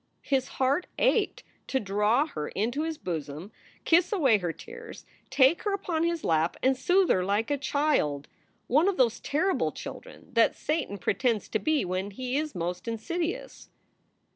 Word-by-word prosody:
His 265 Hz, -2 st, 0 dB
heart 275 Hz, +7 st, +1 dB
ached -, -, +1 dB, 0.2 s
to 265 Hz, -, 0 dB
draw 210 Hz, +6 st, +2 dB
her 150 Hz, -, -5 dB
into 240 Hz, +8 st, -1 dB
his 320 Hz, 0 st, -3 dB
bosom, 160 Hz, -, -5 dB, 0.3 s
kiss 340 Hz, +2 st, +4 dB
away 270 Hz, -, +4 dB
her 175 Hz, -3 st, -2 dB
tears, 465 Hz, -, -11 dB, 0.2 s
take 265 Hz, +4 st, +4 dB
her 410 Hz, -, -1 dB
upon 360 Hz, -5 st, -2 dB
his 340 Hz, -1 st, -1 dB
lap, 160 Hz, +1 st, +1 dB
and 265 Hz, +1 st, +4 dB
soothe 360 Hz, +8 st, +3 dB
her 185 Hz, -, +2 dB
like 205 Hz, +6 st, 0 dB
a -, -, +3 dB
child, 275 Hz, -, 0 dB, 0.4 s
one 300 Hz, +9 st, +3 dB
of 395 Hz, -, +1 dB
those 240 Hz, -3 st, +2 dB
terrible 365 Hz, +7 st, 0 dB
children -, -, -10 dB
that 230 Hz, -1 st, +4 dB
Satan 300 Hz, -9 st, -2 dB
pretends 225 Hz, +1 st, 0 dB
to 220 Hz, -, 0 dB
be 310 Hz, -2 st, +1 dB
when 185 Hz, +2 st, -2 dB
he 250 Hz, +5 st, -4 dB
is 305 Hz, -4 st, -2 dB
most 180 Hz, +4 st, -4 dB
insidious. 335 Hz, -, -4 dB
260 Hz, 165 wpm, -28 LUFS, 200-320 Hz, 0.4 s, kiss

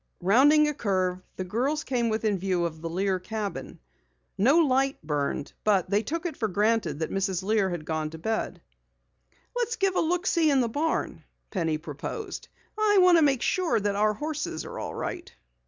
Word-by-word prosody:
Rounding 290 Hz, +10 st, +5 dB
a 300 Hz, -, 0 dB
curve, 185 Hz, -7 st, -1 dB
the 185 Hz, -, -3 dB
girls 255 Hz, +11 st, -1 dB
came 240 Hz, -3 st, 0 dB
within 215 Hz, -3 st, 0 dB
view 180 Hz, -2 st, 0 dB
of 160 Hz, -2 st, -5 dB
the 165 Hz, -, -4 dB
Lear 190 Hz, +2 st, 0 dB
cabin. 210 Hz, +1 st, -5 dB, 0.6 s
No 265 Hz, -, +4 dB
light 270 Hz, -4 st, +2 dB
burned, 145 Hz, -1 st, -2 dB
but 195 Hz, -3 st, +2 dB
they 205 Hz, +1 st, +3 dB
took 325 Hz, -, -4 dB
it 330 Hz, -5 st, -3 dB
for 220 Hz, -, -1 dB
granted 210 Hz, -5 st, +1 dB
Mrs. 190 Hz, +3 st, -1 dB
Lear 210 Hz, -1 st, +2 dB
had 175 Hz, -4 st, -5 dB
gone 155 Hz, -1 st, -2 dB
to 160 Hz, -, -9 dB
bed. 220 Hz, +7 st, -3 dB, 0.9 s
"Let's 475 Hz, -1 st, -1 dB
give 390 Hz, -3 st, 0 dB
a -, -, +3 dB
look 350 Hz, +3 st, 0 dB
see 330 Hz, -5 st, +3 dB
in 275 Hz, -2 st, +3 dB
the 245 Hz, -, +2 dB
barn," 300 Hz, +8 st, -2 dB, 0.3 s
Penny 165 Hz, -5 st, 0 dB
proposed. 165 Hz, -, -6 dB, 0.3 s
"I 430 Hz, -1 st, +3 dB
want 360 Hz, -2 st, +6 dB
to -, -, +3 dB
make 275 Hz, -5 st, +3 dB
sure 365 Hz, -9 st, +1 dB
that 205 Hz, -1 st, -1 dB
our 210 Hz, +1 st, +2 dB
horses 300 Hz, -, -4 dB
are -, -, -7 dB
all -, -, -5 dB
right." -, -, -5 dB
215 Hz, 185 wpm, -27 LUFS, 185-300 Hz, 0.9 s, want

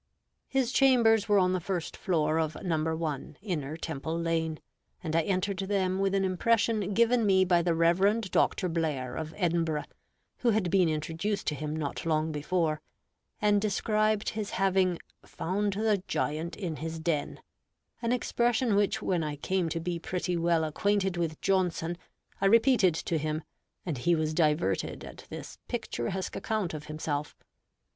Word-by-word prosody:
His 265 Hz, -3 st, 0 dB
chambers 230 Hz, -6 st, +4 dB
were 205 Hz, -, +5 dB
on 185 Hz, -1 st, +3 dB
the 185 Hz, -, +1 dB
first 180 Hz, -1 st, -3 dB
floor 160 Hz, -3 st, +1 dB
of 160 Hz, -1 st, -1 dB
No. 160 Hz, -2 st, 0 dB
1, 155 Hz, -3 st, -4 dB
Inner 155 Hz, -7 st, -3 dB
Temple 160 Hz, 0 st, -4 dB
lane, 165 Hz, -1 st, -1 dB, 0.4 s
and 160 Hz, 0 st, -2 dB
I 165 Hz, -, +5 dB
entered 190 Hz, +2 st, -1 dB
them 190 Hz, -1 st, 0 dB
with 195 Hz, 0 st, +1 dB
an 195 Hz, -1 st, +2 dB
impression 205 Hz, +1 st, +1 dB
given 235 Hz, +1 st, +4 dB
me 190 Hz, -2 st, +4 dB
by 175 Hz, -2 st, +4 dB
the 170 Hz, -1 st, +1 dB
Reverend 190 Hz, +5 st, +2 dB
Dr. 185 Hz, -, +2 dB
Blair, 155 Hz, -7 st, -2 dB
of 160 Hz, -1 st, -4 dB
Edinburgh, 165 Hz, -5 st, 0 dB, 0.6 s
who 245 Hz, -, +2 dB
had 205 Hz, -6 st, +1 dB
been 185 Hz, -3 st, +4 dB
introduced 165 Hz, +6 st, -2 dB
to -, -, 0 dB
him 150 Hz, +1 st, -4 dB
not 150 Hz, -3 st, -3 dB
long 160 Hz, -1 st, +1 dB
before, 155 Hz, +1 st, 0 dB, 0.6 s
and 205 Hz, -1 st, +3 dB
described 215 Hz, 0 st, +1 dB
his 215 Hz, -2 st, -4 dB
having 190 Hz, -2 st, +2 dB, 0.3 s
"found 200 Hz, +3 st, -2 dB
the 210 Hz, -1 st, +1 dB
giant 165 Hz, -1 st, -2 dB
in 170 Hz, -7 st, -4 dB
his 160 Hz, +1 st, -5 dB
den"; 160 Hz, -3 st, -1 dB, 0.6 s
an 230 Hz, 0 st, 0 dB
expression 240 Hz, -1 st, +1 dB
which, 205 Hz, 0 st, +1 dB
when 175 Hz, -3 st, +1 dB
I 150 Hz, -1 st, -3 dB
came 180 Hz, +3 st, -1 dB
to 165 Hz, -, -2 dB
be 170 Hz, 0 st, -3 dB
pretty 180 Hz, +1 st, -2 dB
well 170 Hz, -1 st, +2 dB
acquainted 190 Hz, +4 st, 0 dB
with 165 Hz, -3 st, -2 dB
Johnson, 180 Hz, -3 st, +1 dB, 0.5 s
I 195 Hz, -, +4 dB
repeated 225 Hz, -, +5 dB
to 165 Hz, 0 st, -1 dB
him, 155 Hz, +1 st, -2 dB, 0.4 s
and 155 Hz, -8 st, -3 dB
he 170 Hz, +6 st, +3 dB
was 155 Hz, -1 st, -1 dB
diverted 155 Hz, 0 st, +1 dB
at -, -, -11 dB
this -, -, -8 dB
picturesque 200 Hz, -5 st, -3 dB
account 215 Hz, -7 st, -2 dB
of 150 Hz, -1 st, -6 dB
himself. 150 Hz, -1 st, -3 dB
175 Hz, 160 wpm, -29 LUFS, 160-200 Hz, 0.6 s, were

